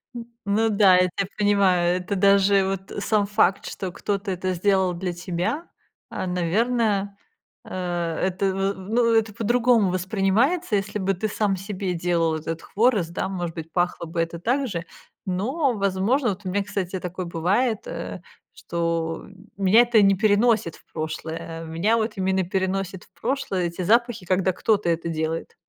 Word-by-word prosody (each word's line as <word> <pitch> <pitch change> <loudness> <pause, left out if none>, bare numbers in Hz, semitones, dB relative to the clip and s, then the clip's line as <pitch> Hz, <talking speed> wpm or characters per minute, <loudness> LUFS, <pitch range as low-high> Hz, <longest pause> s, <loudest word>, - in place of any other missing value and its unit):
Н 235 -1 -6 0.2
ну 215 +3 +2
да, 200 -3 +5
я 180 0 +3
тебя 195 -2 -1
понимаю, 190 -4 +3
это 185 +2 -3
даже 195 0 +4
вот 195 +1 -4
сам 210 -2 +2
факт, 200 -2 +2
что 190 -2 -5
кто-то 200 +2 -3
это 185 0 -2
сделал 190 0 +2
для 180 +1 -3
тебя, 180 - -3 0.4
а, - - -4
наверно, 200 +3 0 0.5
э, - - -12 0.6
это 190 +1 -2
в 195 +1 0
ну, 230 +5 +1
это 225 -1 +2
по-другому 230 -1 +3
воспринимается. 205 - +1
Если 205 +1 -2
бы 195 +1 0
ты 215 +5 -2
сам 205 -1 0
себе 190 -1 -4
делал 165 -2 +1
этот 160 +1 -4
хворост, 210 -6 +1
да, 185 - -2
может 175 -3 -4
быть, 160 0 -7
пахло 175 -1 0
бы 165 +1 -2
это 165 0 -3
так 255 +8 0
же, 170 -5 -4 0.4
но, 250 - 0
возможно 200 +6 +1
Вот 200 0 -5
у - - -2
меня, 200 +2 0
кстати, 195 -2 -3
такое 180 +1 -5
бывает, 195 +8 0
э, - - -6 0.3
что 165 -1 -2 0.3
меня 200 +4 +6
это 240 -2 +4
не 195 0 +5
переносит 210 -3 +2
в - - -21
прошлое, 165 +1 -5
меня 170 +8 +1
вот 220 -1 -2
именно 190 0 +1
переносят 190 0 -2
в - - -32
прошлое 235 -7 -1
эти 170 +2 -4
запахи, 230 0 +2
когда 185 +1 +2
кто-то 210 -1 +1
это 170 0 -1
делает. 160 0 -3
195 Hz, 165 wpm, -24 LUFS, 175-210 Hz, 0.6 s, меня